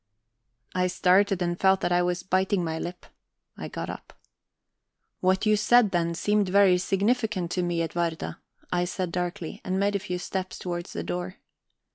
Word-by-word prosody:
I 180 Hz, 0 st, +1 dB
started, 190 Hz, +1 st, +3 dB
and 175 Hz, 0 st, -2 dB
felt 190 Hz, 0 st, +4 dB
that -, -, 0 dB
I 175 Hz, 0 st, +4 dB
was 180 Hz, 0 st, -1 dB
biting 190 Hz, 0 st, +1 dB
my 160 Hz, -1 st, -2 dB
lip. 175 Hz, +2 st, -6 dB, 0.5 s
I -, -, -6 dB
got -, -, -5 dB
up. -, -, -8 dB, 1.1 s
"What 190 Hz, +3 st, +2 dB
you 215 Hz, 0 st, +4 dB
said 220 Hz, 0 st, +4 dB
then 170 Hz, -1 st, 0 dB
seemed 205 Hz, +2 st, +1 dB
very 190 Hz, -2 st, +5 dB
significant 200 Hz, -1 st, 0 dB
to 180 Hz, -, 0 dB
me, 175 Hz, -1 st, 0 dB
Edwarda," 165 Hz, 0 st, -3 dB, 0.3 s
I 175 Hz, 0 st, +1 dB
said 180 Hz, 0 st, -3 dB
darkly, 175 Hz, -1 st, -4 dB
and 185 Hz, 0 st, -1 dB
made 200 Hz, +1 st, +1 dB
a -, -, +1 dB
few 180 Hz, -2 st, -4 dB
steps 185 Hz, 0 st, -4 dB
towards 175 Hz, -1 st, -5 dB
the 85 Hz, -, -3 dB
door. 90 Hz, +1 st, -4 dB
180 Hz, 170 wpm, -26 LUFS, 175-195 Hz, 1.1 s, very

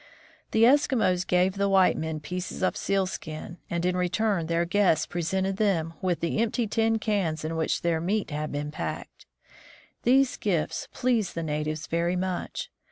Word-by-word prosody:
The 220 Hz, -, +3 dB
Eskimos 235 Hz, -9 st, +3 dB
gave 180 Hz, +1 st, +3 dB
the 200 Hz, 0 st, +1 dB
white 190 Hz, -1 st, +5 dB
men 160 Hz, -1 st, -3 dB
pieces 180 Hz, +4 st, -5 dB
of 185 Hz, -, +2 dB
sealskin, 180 Hz, -4 st, -3 dB
and 170 Hz, 0 st, -1 dB
in 180 Hz, 0 st, +1 dB
return 180 Hz, 0 st, 0 dB
their 170 Hz, +1 st, +1 dB
guests 180 Hz, -3 st, +3 dB
presented 190 Hz, +3 st, -1 dB
them 170 Hz, -6 st, +1 dB
with 180 Hz, -3 st, 0 dB
the 170 Hz, +5 st, 0 dB
empty 230 Hz, +1 st, +1 dB
tin 225 Hz, +1 st, +1 dB
cans 190 Hz, -8 st, -1 dB
in 160 Hz, +1 st, -2 dB
which 160 Hz, 0 st, -1 dB
their 165 Hz, -2 st, +1 dB
meat 200 Hz, +1 st, -1 dB
had 150 Hz, +1 st, -3 dB
been 145 Hz, +1 st, -3 dB
packed. -, -, -6 dB, 0.7 s
These 265 Hz, +1 st, +3 dB
gifts 175 Hz, -7 st, -1 dB
pleased 235 Hz, -6 st, 0 dB
the 165 Hz, -, -2 dB
natives 155 Hz, 0 st, -2 dB
very 170 Hz, +2 st, 0 dB
much. 185 Hz, 0 st, -3 dB
180 Hz, 165 wpm, -27 LUFS, 165-205 Hz, 0.7 s, white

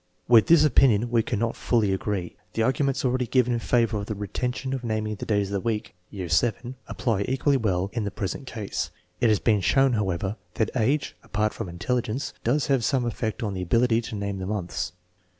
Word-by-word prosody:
With 115 Hz, -2 st, +6 dB
this 165 Hz, -2 st, +6 dB
opinion 120 Hz, -5 st, +4 dB
we 115 Hz, -1 st, +4 dB
cannot 115 Hz, 0 st, -1 dB
fully 110 Hz, -5 st, +1 dB
agree. 95 Hz, -2 st, -3 dB, 0.2 s
The 115 Hz, -, +2 dB
arguments 135 Hz, +2 st, +1 dB
already 125 Hz, -1 st, +1 dB
given 125 Hz, 0 st, +2 dB
in 120 Hz, -, 0 dB
favor 115 Hz, -2 st, +1 dB
.of 100 Hz, 0 st, -4 dB
the 110 Hz, -, -3 dB
retention 125 Hz, +6 st, -3 dB
of 130 Hz, -2 st, -3 dB
naming 110 Hz, -2 st, -1 dB
the 105 Hz, -, -7 dB
days 100 Hz, -2 st, +1 dB
of -, -, -5 dB
the 100 Hz, -, +1 dB
week 110 Hz, +1 st, -2 dB, 0.2 s
(year 95 Hz, -4 st, -5 dB
VII), 120 Hz, +8 st, +1 dB
apply 110 Hz, -5 st, -1 dB
equally 135 Hz, +2 st, +2 dB
well 100 Hz, -5 st, 0 dB
in 115 Hz, -2 st, -1 dB
the 100 Hz, -, -1 dB
present 105 Hz, +7 st, -4 dB
case. 110 Hz, -5 st, -3 dB, 0.3 s
It 120 Hz, -, +3 dB
has 105 Hz, -, +4 dB
been 105 Hz, -4 st, +2 dB
shown, 135 Hz, +7 st, +3 dB
however, 100 Hz, -1 st, -1 dB, 0.2 s
that 110 Hz, -, 0 dB
age, 135 Hz, +5 st, +1 dB
apart 105 Hz, +1 st, -1 dB
from 110 Hz, -6 st, -5 dB
intelligence, 120 Hz, -, -2 dB
does 130 Hz, +4 st, +2 dB
have 135 Hz, -4 st, +2 dB
some 130 Hz, 0 st, +1 dB
effect 115 Hz, 0 st, -3 dB
on 105 Hz, -3 st, -2 dB
the 95 Hz, -, -3 dB
ability 115 Hz, +5 st, +2 dB
to 115 Hz, -, -6 dB
name 100 Hz, -1 st, -3 dB
the 95 Hz, -, -4 dB
months. 95 Hz, -5 st, -3 dB
115 Hz, 205 wpm, -25 LUFS, 100-125 Hz, 0.3 s, With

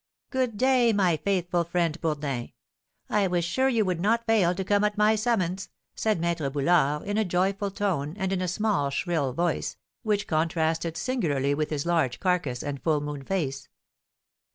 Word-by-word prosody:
"Good 255 Hz, -5 st, -1 dB
day, 255 Hz, -1 st, +4 dB
my 185 Hz, -5 st, +2 dB
faithful 175 Hz, 0 st, 0 dB
friend, 170 Hz, -1 st, -1 dB
Bourdin, 145 Hz, -6 st, -2 dB, 0.5 s
I 205 Hz, -2 st, +2 dB
was 175 Hz, -2 st, 0 dB
sure 260 Hz, +10 st, +1 dB
you 230 Hz, -4 st, +2 dB
would 180 Hz, -3 st, -1 dB
not 230 Hz, +4 st, +2 dB
fail 200 Hz, -6 st, +3 dB
to 190 Hz, -, -2 dB
come 205 Hz, +2 st, +2 dB
at 210 Hz, 0 st, 0 dB
my 210 Hz, +1 st, +4 dB
summons!" 195 Hz, -5 st, -1 dB, 0.2 s
said 215 Hz, -5 st, 0 dB
Maître 165 Hz, -4 st, -1 dB
Boulard, 150 Hz, 0 st, +2 dB
in 205 Hz, +1 st, -1 dB
a -, -, +3 dB
joyful 195 Hz, +2 st, 0 dB
tone, 180 Hz, -7 st, -2 dB
and 190 Hz, -2 st, -1 dB
in 185 Hz, -, -1 dB
a 185 Hz, -, -1 dB
small, 190 Hz, -6 st, 0 dB
shrill 145 Hz, -1 st, -1 dB
voice, 170 Hz, +5 st, -1 dB, 0.2 s
which 210 Hz, -2 st, 0 dB
contrasted 160 Hz, 0 st, 0 dB
singularly 155 Hz, -, 0 dB
with 150 Hz, +1 st, -1 dB
his 150 Hz, -1 st, -2 dB
large 160 Hz, -8 st, +1 dB
carcass 170 Hz, -10 st, 0 dB
and 145 Hz, -2 st, -4 dB
full 155 Hz, -3 st, +2 dB
moon 145 Hz, -1 st, -5 dB
face. 135 Hz, -6 st, -3 dB
175 Hz, 175 wpm, -26 LUFS, 155-205 Hz, 0.5 s, day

